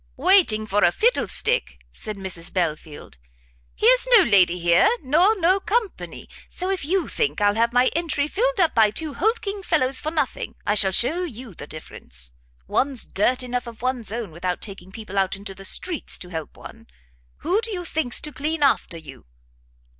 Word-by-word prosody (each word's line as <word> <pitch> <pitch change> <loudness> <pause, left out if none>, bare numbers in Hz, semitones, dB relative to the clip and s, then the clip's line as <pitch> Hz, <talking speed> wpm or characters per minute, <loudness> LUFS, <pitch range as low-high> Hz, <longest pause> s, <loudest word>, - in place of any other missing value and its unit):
"Waiting 305 - +4
for 205 0 +1
a 175 - +5
fiddlestick!" 475 - 0
said 215 -2 -6
Mrs 185 -3 -4
Belfield; 155 - -4 0.6
"here's - - +4
no 400 - +7
lady 185 - +4
here, 170 - +4
nor 350 +10 +3
no 370 +3 +3
company; 435 +1 -3 0.2
so 370 +1 -3
if 385 - -2
you 360 +5 0
think 450 - -1
I'll 205 0 +3
have 230 +2 +1
my 245 +1 +4
entry 310 -4 0
filled 480 +7 -1
up 340 -4 +3
by 220 -2 +5
two 300 +8 -4
hulking 410 +2 -1
fellows 270 -8 +1
for 310 - -3
nothing, 320 0 -3
I 205 - +2
shall 200 -2 +3
shew 285 - +2
you 250 - -8
the 145 - -10
difference. 60 - -7 0.4
One's 270 -3 0
dirt 250 +6 0
enough 250 0 -3
of 230 0 -11
one's 255 -4 -2
own, 225 -5 -5
without 180 +2 -3
taking 195 -3 -8
people 200 -2 -4
out 190 -1 0
of 200 +1 -13
the 195 - -12
streets 340 - -3
to 180 - -10
help 160 -3 -7
one. - - -13 0.6
Who 375 +7 +2
do 460 -1 -2
you 360 -3 -4
think's 310 -7 0
to 300 - -6
clean 300 +2 -2
after 265 -10 +1
you?" 160 - -13
255 Hz, 180 wpm, -23 LUFS, -, 0.6 s, no